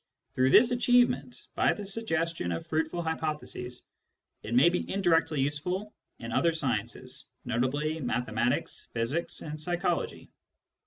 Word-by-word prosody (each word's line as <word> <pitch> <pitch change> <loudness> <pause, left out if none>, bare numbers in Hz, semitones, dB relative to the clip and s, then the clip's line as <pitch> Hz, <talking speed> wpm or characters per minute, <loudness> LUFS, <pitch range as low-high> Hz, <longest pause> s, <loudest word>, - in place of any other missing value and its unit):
Through 130 +1 +3
this 230 - +7
achievement, 245 0 +2
by - - +3
the 205 - -7
suggestion 165 - -1
of 85 - -3
fruitful 160 +2 -1
hypotheses, 155 -6 -3 0.6
it 115 +3 -3
may 130 +7 +7
be 180 - -2
indirectly 165 -6 +2
useful 180 +9 -2 0.2
in 115 0 -7
other 165 +7 +2
sciences, 125 -3 -2 0.2
notably 145 +6 0
mathematics, 120 -2 -1
physics, 120 +9 -1
and 155 0 -6
psychology. 175 +3 -2
155 Hz, 120 wpm, -29 LUFS, 125-175 Hz, 0.6 s, this